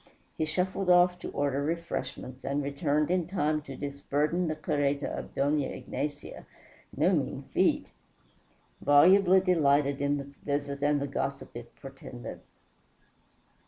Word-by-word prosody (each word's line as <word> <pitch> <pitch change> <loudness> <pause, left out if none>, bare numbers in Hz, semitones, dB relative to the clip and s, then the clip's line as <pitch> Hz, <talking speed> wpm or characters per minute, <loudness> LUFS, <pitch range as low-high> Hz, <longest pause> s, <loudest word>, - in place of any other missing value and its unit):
He 160 - -1
shuffled 185 +4 -1
off 180 0 +5
to - - -6
order 140 -1 -1
refreshments, 145 -5 -4
and 140 +2 -1
returned 145 +2 0
in 180 -3 +1
time 155 -4 0
to 140 -2 -9
disburden 145 +4 -1
the 155 - -1
carreta 145 -2 0
of - - -8
Dona 145 0 +1
Ignacia 145 +2 -6 0.5
no - - +3
mean - - -1
feat - - +2 1.0
volubly 185 +6 +6
delighted 145 -6 +2
in 145 0 +1
the 140 0 -7
visit 140 -1 -2
and 145 0 +2
the 140 - -2
gossip 135 -1 -4
it 120 0 -9
portended. 135 -3 -9
145 Hz, 130 wpm, -29 LUFS, 140-165 Hz, 1.0 s, volubly